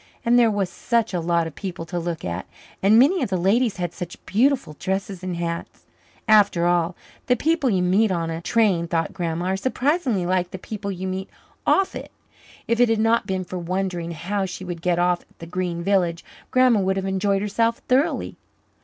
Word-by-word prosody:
And 240 +1 +5
there 235 -2 +5
was 205 -3 0
such 235 -4 0
a 180 - 0
lot 170 0 +1
of 160 - -6
people 175 -1 -6
to 175 +2 -3
look 170 -1 -4
at, 85 -1 -4 0.3
and 205 +3 +5
many 300 +10 +5
of 250 - -1
the 190 - 0
ladies 205 +5 +2
had 175 -2 -3
such 175 -2 -7
beautiful 245 - +1
dresses 190 -1 -3
and 185 -1 -3
hats. 170 0 -5 0.4
After 205 -5 +5
all, 175 0 +1 0.3
the 250 - +4
people 310 +1 +1
you 185 -4 +1
met 195 +4 +3
on 165 -2 -1
a 165 +1 -4
train, 190 -5 +2
thought 165 -1 -1
Grandma, 170 -1 -2
are 190 +1 +1
surprisingly 260 - 0
like 180 0 0
the 190 - -6
people 200 +1 -5
you 185 0 -5
meet 190 +1 -4 0.4
off 390 0 +3
it. - - -7 0.6
If 230 0 +1
it 245 -1 +5
had 225 - +2
not 225 +2 +2
been 190 -1 -1
for 180 +1 -6
wondering 175 -1 -2
how 190 +4 -2
she 185 +1 -7
would 175 -2 -6
get 175 0 +1
off 175 0 +1 0.2
at 165 0 -10
Green 180 -2 -2
Village, 175 -3 +1 0.2
Grandma 255 -4 +4
would 190 0 0
have 195 - -2
enjoyed 195 +1 0
herself 230 +3 +1
thoroughly. 265 +5 +1
190 Hz, 200 wpm, -23 LUFS, 175-220 Hz, 0.6 s, And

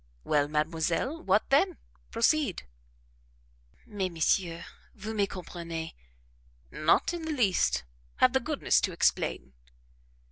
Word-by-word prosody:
"Well, 145 -1 +2
mademoiselle 165 - -1
what 220 - +1
then? 345 +6 +3 0.3
Proceed." 230 - +1 1.2
"Mais, 195 -3 -3
monsieur, 170 +1 0 0.3
vous 215 +1 -6
me 205 -2 +1
comprenez." 170 -3 -6 0.8
"Not 155 - +2
in 345 - -4
the 320 0 -3
least; 215 - +2 0.3
have 255 - +4
the 265 - +3
goodness 285 +3 +1
to 185 - -1
explain." 65 - 0
195 Hz, 110 wpm, -29 LUFS, 165-265 Hz, 1.2 s, have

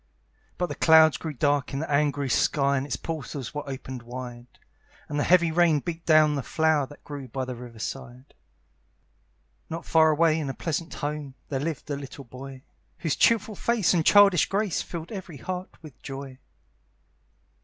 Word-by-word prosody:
But 180 - 0
the - - -5
clouds 160 -1 +6
grew 160 -2 -5
dark 145 +1 +1
in 135 - -2
the 155 - -4
angry 145 -1 +1
sky, 140 +2 +2
And 135 +1 -1
its 125 - -2
portals 140 -4 -6
were 145 -1 -5
opened 130 -1 -6
wide; 120 0 -8 0.6
And 145 0 -3
the - - +2
heavy 170 -2 +4
rain 165 -2 +4
beat 165 +2 -6
down 155 -2 +6
the 140 - -1
flower 155 0 +1
That 145 - -15
grew 145 -3 -7
by 130 +2 -4
the 125 - -5
river 120 -1 -10
side. 125 +3 -7 1.4
Not 165 +1 -5
far 160 -1 +5
away 160 +1 +3
in 145 -3 -3
a 135 - -4
pleasant 165 0 -3
home, 145 -2 -4
There 135 - -1
lived 155 +1 -4
a - - 0
little 140 0 -9
boy, 130 +2 -10 0.3
Whose 160 -4 -1
cheerful 220 -2 +3
face 220 -2 +1
and 170 -3 +2
childish 200 -2 +6
grace 200 -2 0
Filled 170 +1 -7
every 185 -7 -7
heart 185 +4 -5
with 150 -4 -13
joy. 135 -2 -8
145 Hz, 175 wpm, -26 LUFS, 135-165 Hz, 1.4 s, clouds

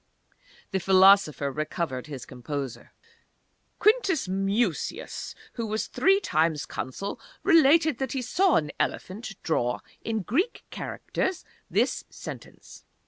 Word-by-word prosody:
The 190 - +1
philosopher 190 -6 +5
recovered 150 -2 -3
his 140 -5 -7
composure. 130 +1 -6 0.9
"Quintus 410 - +3
Mucius, 195 0 -1 0.2
who 230 -2 -3
was 215 +1 -1
three 390 +1 +3
times 160 - +1
Consul, 165 +10 -5 0.2
relates 330 -3 +6
that 265 -2 -2
he 265 -2 -2
saw 370 +7 +3
an 150 -2 +1
elephant 200 +2 -3
draw 125 -7 0 0.2
in 220 -2 -2
Greek 330 - 0
characters 375 -2 -3 0.2
this - - +1
sentence. - - -10
195 Hz, 110 wpm, -27 LUFS, -, 0.9 s, relates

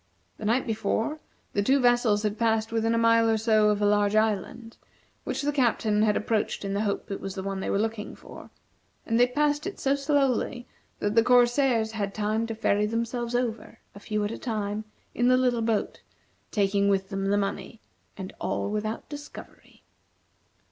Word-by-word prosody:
The 215 - -6
night 240 +5 +2
before, 225 +5 -1 0.3
the 200 - +1
two 270 +7 +3
vessels 240 -4 +3
had 210 +1 -2
passed 225 -1 +1
within 225 0 +1
a - - +1
mile 230 0 +4
or 220 - +3
so 215 -1 +3
of 210 0 +1
a - - +4
large 205 0 +2
island, 220 +2 -1 0.5
which - - -3
the 290 - +1
Captain 230 -6 +1
had 215 -1 +3
approached 215 -2 -1
in 195 - -2
the 200 - 0
hope 205 0 -2
it 195 - -4
was 195 -1 -5
the 190 - -4
one 195 0 -3
they - - -3
were - - +1
looking 220 0 -3
for, - - -12 0.6
and 230 0 +1
they 245 - +6
passed 295 +4 0
it 395 - -6
so 275 - +2
slowly 275 -4 0 0.3
that 205 - -1
the 230 - +5
corsairs 245 -1 +3
had 200 -3 -3
time 215 +2 -1
to 225 - -4
ferry 210 -1 +1
themselves 235 +2 -2
over, 235 -3 -3 0.2
a 200 - -11
few 210 0 -2
at 205 - -3
a - - -6
time, 215 -2 -3 0.3
in 245 - +1
the 255 0 +5
little 250 -2 +1
boat, 225 -2 -1 0.5
taking 200 -1 +1
with 190 -1 0
them 195 -1 -2
the 200 +1 +2
money, 205 +3 -3 0.4
and 190 -1 -7
all 205 - -2
without 215 +1 -3
discovery. 290 -1 -11
220 Hz, 190 wpm, -26 LUFS, 205-240 Hz, 0.6 s, they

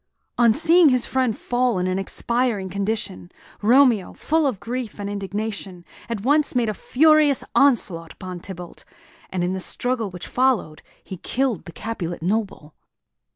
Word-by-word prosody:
On 235 -2 +6
seeing 330 +1 +5
his 255 -2 +2
friend 255 -4 0
fall 245 -3 0
in 180 - 0
an 185 +1 0
expiring 230 0 -1
condition, 200 -2 -3 0.3
Romeo, 235 -3 +4
full 315 -1 +1
of 240 -8 -2
grief 240 -3 -5
and 200 - -4
indignation, 200 -2 -5 0.2
at 230 -4 -3
once 290 +4 +2
made 235 -3 +2
a - - -1
furious 305 +3 +3
onslaught 195 -12 +2
upon 185 -1 -8
Tybalt; 175 -1 -10 0.5
and 185 -1 -2
in 180 +1 0
the 190 - -3
struggle 240 +2 -2
which 180 -2 -8
followed 250 -12 0 0.2
he 190 - -8
killed 250 +1 -2
the 170 - -9
Capulet 175 -5 -5
noble. 195 -6 -2
220 Hz, 155 wpm, -22 LUFS, 185-255 Hz, 0.5 s, On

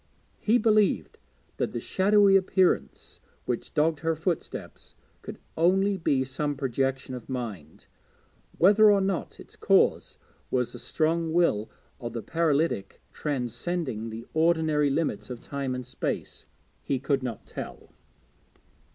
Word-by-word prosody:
He 225 +3 +3
believed 215 -3 +2 0.4
that - - -2
the - - -2
shadowy 200 0 +4
appearance 190 -1 +1 0.3
which 120 - -3
dogged 155 0 +2
her 165 +1 0
footsteps 165 +1 -5 0.3
could - - -8 0.2
only 190 +4 +3
be 140 -7 +1
some 145 +3 -2
projection 135 0 -2
of 125 -1 -8
mind, 110 - -6 0.7
whether 210 +4 +6
or 205 -1 +5
not 190 -2 -2
its - - -13
cause - - +2 0.3
was 125 -2 0
the - - -8
strong 160 0 0
will 140 -12 +2 0.3
of 120 -3 -6
the 115 -2 -4
paralytic 160 -6 0
transcending 130 -2 -3
the 115 +1 -7
ordinary 160 -2 +2
limits 150 0 -1
of 125 -2 -6
time 135 -1 -4
and 125 -1 -5
space, 125 - -5 0.3
he 135 - -1
could 135 +1 0
not 120 -4 -5
tell. - - -9
150 Hz, 130 wpm, -27 LUFS, 125-175 Hz, 0.7 s, whether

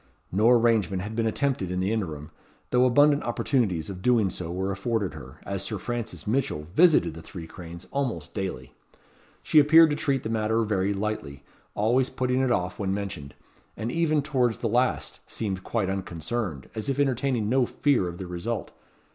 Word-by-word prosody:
No 105 +5 +4
arrangement 115 -6 +3
had 110 +2 -6
been 115 0 +1
attempted 125 -5 0
in 90 0 -2
the 95 +4 0
interim, 80 -8 -4 0.4
though 125 0 +4
abundant 145 +3 +5
opportunities 115 - 0
of 95 -2 -7
doing 115 -4 +3
so 85 -2 -5
were 95 +2 -2
afforded 100 -3 -1
her, 70 -2 -11
as 100 -1 -3
Sir 105 +1 -3
Francis 120 +1 -5
Mitchell 105 - -1
visited 165 - +5
the 80 - -9
Three 80 +1 -9
Cranes 85 0 -10
almost 120 - -2
daily. 95 -3 -5 0.7
She 155 - +5
appeared 160 +2 +7
to - - +1
treat 140 -3 0
the - - -3
matter 110 0 +1
very 100 -2 0
lightly, 100 -9 -4 0.3
always 120 +5 +2
putting 125 0 0
it 130 - +1
off 90 -6 -1
when 95 -1 0
mentioned; 95 -9 -6 0.4
and 115 +2 -3
even 155 -2 +1
towards 125 -6 +1
the 115 - -2
last 105 - 0
seemed 95 -4 -4
quite 110 -5 -1
unconcerned, 95 - -3
as 110 +3 -4
if 135 0 -1
entertaining 130 -4 +1
no 125 +1 +2
fear 135 -11 +1
of 85 0 -6
the 95 - -6
result. 90 +6 -4
110 Hz, 180 wpm, -26 LUFS, 95-125 Hz, 0.7 s, appeared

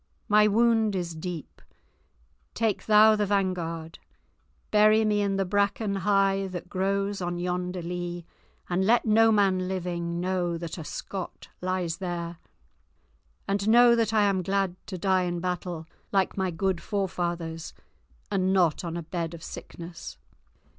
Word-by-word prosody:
My 210 -1 +5
wound 225 -1 +3
is 175 -2 -3
deep; 160 -1 -7 0.9
take 220 -3 -1
thou 215 0 +7
the 210 -1 0
vanguard; 175 -5 -2 0.7
bury 215 +1 +5
me 210 -1 +2
in 200 -1 0
the 195 0 0
bracken 200 +2 0
high 195 0 +2
that 180 -1 -6
grows 195 +1 -1
on 175 0 -2
yonder 180 0 -2
lea, 175 0 -4 0.4
and 180 +1 0
let 230 +5 +3
no 225 +1 +5
man 190 -3 +2
living 175 -2 -3
know 180 -2 -1
that 170 +1 -6
a - - -5
Scot 185 +4 -7
lies 180 -2 -1
there. 175 -2 -4 1.1
And 200 +1 0
know 240 +1 +7
that 230 -2 +1
I 215 -2 +3
am 195 -2 +2
glad 195 0 0
to 185 - -5
die 185 0 +2
in 175 -1 -2
battle, 175 -2 -3 0.3
like 195 -2 +1
my 190 -1 0
good 180 +1 -1
forefathers, 175 -4 -3 0.6
and 185 -1 +1
not 180 -5 +2
on 170 -1 -4
a 170 - -4
bed 165 0 -4
of 165 - -12
sickness." 170 0 -9
185 Hz, 145 wpm, -27 LUFS, 175-200 Hz, 1.1 s, thou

